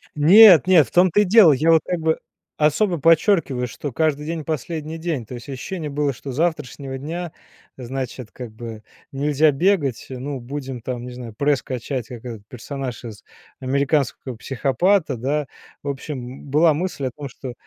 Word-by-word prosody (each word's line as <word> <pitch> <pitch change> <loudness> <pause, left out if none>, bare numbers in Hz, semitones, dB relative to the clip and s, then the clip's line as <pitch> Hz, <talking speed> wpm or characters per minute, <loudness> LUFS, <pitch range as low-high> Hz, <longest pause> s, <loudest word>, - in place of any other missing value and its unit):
Нет-нет, 180 0 +7
в - - -18
том-то 180 +3 +4
и - - +4
дело. 190 -5 +7
Я 160 +5 +3
вот 160 - +5
как 175 -2 -2
бы 160 0 0 0.4
особо 165 +3 +2
подчёркиваю, 165 -5 +3
что 140 +4 -6
каждый 150 -1 0
день- 160 -1 -4
последний 155 +1 -4
день. 160 -7 -3
То 125 - -10
есть 120 - -10
ощущение 150 +4 -5
было, 145 0 0
что 135 +2 -8
с - - -7
завтрашнего 150 -4 -2
дня, 165 +4 -5 0.5
значит, 125 -2 -6
как 125 -3 -8
бы 110 -1 -9 0.3
нельзя 145 +2 +2
бегать. 145 - 0
Ну, 135 +2 -5
будем 130 -1 -6
там, 120 0 -5
не 125 - -7
знаю, 120 -3 -8
пресс 140 +3 +1
качать, 125 -1 -4
как 120 -2 -10
этот 110 -4 -8
персонаж 130 +1 -6
из 110 -2 -9 0.4
"Американского 135 -1 -1
психопата", 140 - +1
да. 140 +4 -1 0.3
В 140 - -9
общем, 140 0 -4 0.2
м, - - -13
была 155 +2 +4
мысль 160 -4 -3
о - - -5
том, 145 -2 -6
что 125 0 -8
140 Hz, 175 wpm, -21 LUFS, 130-160 Hz, 0.5 s, Нет-нет